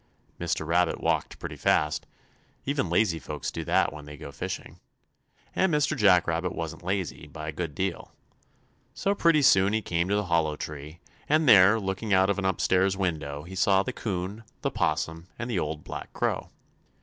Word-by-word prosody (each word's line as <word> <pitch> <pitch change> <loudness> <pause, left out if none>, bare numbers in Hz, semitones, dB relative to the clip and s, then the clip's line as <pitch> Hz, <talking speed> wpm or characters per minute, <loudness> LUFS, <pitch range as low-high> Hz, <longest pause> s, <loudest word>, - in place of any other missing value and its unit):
Mr. 85 -2 -1
Rabbit 85 +1 +2
walked - - -1
pretty - - -6
fast - - +1 0.6
even 140 - 0
lazy 85 -1 +2
folks 75 -2 -5
do - - -4
that - - +2
when 75 -1 -9
they 75 0 -10
go 70 - -8
fishing, 70 - -6 0.8
and 190 -1 +2
Mr. 150 0 +2
Jack 95 - +5
Rabbit 85 +2 -1
wasn't 80 +1 -5
lazy, 90 -4 -3
by 75 +1 -8
a - - -2
good 80 -1 -5
deal. 95 0 -3 0.8
So 200 - +1
pretty 165 -6 +3
soon 95 -5 +5
he 110 -1 0
came 85 +1 -1
to 100 - +2
the 105 0 0
Hollow 80 -3 +1
Tree, 75 +2 -8 0.3
and 155 +1 +3
there, 100 0 +7
looking 95 +1 -1
out 95 +1 +4
of 100 - -2
an 95 - -2
upstairs 95 +1 +2
window, 75 -6 -2
he 90 +3 -10
saw 95 0 +3
the 125 - -4
'Coon, 100 +1 -4 0.2
the - - 0
'Possum 80 +2 -1
and 120 - -4
the 100 - 0
Old 75 -1 -3
Black - - -7
Crow. - - -1
90 Hz, 185 wpm, -27 LUFS, 80-100 Hz, 0.8 s, there